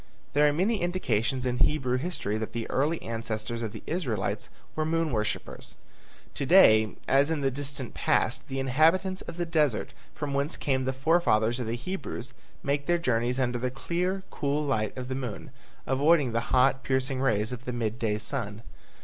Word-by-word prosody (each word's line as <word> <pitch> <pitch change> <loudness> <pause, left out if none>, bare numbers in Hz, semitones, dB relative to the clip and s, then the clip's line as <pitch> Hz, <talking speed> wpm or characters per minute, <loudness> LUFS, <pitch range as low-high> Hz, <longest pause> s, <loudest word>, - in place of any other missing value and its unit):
There 150 +1 +5
are - - +4
many 195 +8 +1
indications 130 - 0
in 125 -1 -1
Hebrew 130 -3 +2
history 135 - -2
that 110 - -5
the 115 -1 -3
early 155 +5 +1
ancestors 115 0 -4
of 110 -2 -3
the 110 - -9
Israelites 125 - -2 0.3
were 155 - 0
moon 165 0 0
worshippers. 110 -2 -3 0.6
To - - -3
day 110 - +6
as 140 +2 +4
in 160 -3 0
the 135 -1 +1
distant 140 -2 -4
past - - +1
the 135 0 -3
inhabitants 165 +8 +2
of 165 - -8
the 175 - -1
deserts 150 -9 +1 0.2
from 145 -1 -3
whence 140 +3 0
came 130 -2 0
the 130 - +1
forefathers 130 -5 +2
of 120 - -3
the 115 - -1
Hebrews 135 -4 -5 0.3
make 140 0 -1
their 175 0 +3
journeys 125 -4 0
under 125 -1 0
the 125 +1 -1
clear, 180 +8 -2
cool 145 +1 -1
light 110 -6 -1
of 125 -1 -4
the 130 - -3
moon, 125 -5 -5 0.3
avoiding 140 0 +3
the 115 - +1
hot, 130 +1 +4
piercing 130 0 0
rays 110 -4 +1
of 125 0 -7
the 125 - -2
mid 115 -1 -2
day 105 -3 0
sun. 110 -2 -2
130 Hz, 185 wpm, -28 LUFS, 115-155 Hz, 0.6 s, day